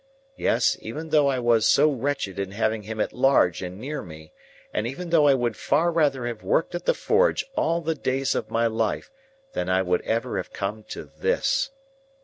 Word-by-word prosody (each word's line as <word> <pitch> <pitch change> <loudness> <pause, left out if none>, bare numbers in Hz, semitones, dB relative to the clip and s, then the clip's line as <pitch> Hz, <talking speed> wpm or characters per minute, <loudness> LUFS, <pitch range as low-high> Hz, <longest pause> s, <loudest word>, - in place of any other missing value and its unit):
Yes; - - +2
even 160 +2 -6
though 150 -2 +4
I 135 -2 +1
was 120 -2 +3
so 150 +2 +5
wretched 130 -7 -2
in 100 -1 -2
having 110 +1 0
him 110 +1 -7
at - - -1
large 125 -8 +3
and 90 0 -6
near 145 +6 -4
me, 80 -2 -12 0.4
and 105 +2 -1
even 165 +7 -6
though 155 -3 +5
I 140 - +6
would 120 -3 -1
far 165 +5 +1
rather 145 -6 +1
have 120 -2 -4
worked 165 - 0
at 175 0 -4
the - - +3
forge 475 +3 +2
all 170 +1 +1
the 165 0 -1
days 135 -2 -1
of - - -3
my 115 +1 +1
life 110 - -1 0.4
than 90 - -2
I 95 +1 +2
would 90 -1 +1
ever 115 +1 -1
have - - -4
come 105 +3 -4
to - - -7
this! 270 - 0
125 Hz, 200 wpm, -25 LUFS, 110-155 Hz, 0.4 s, I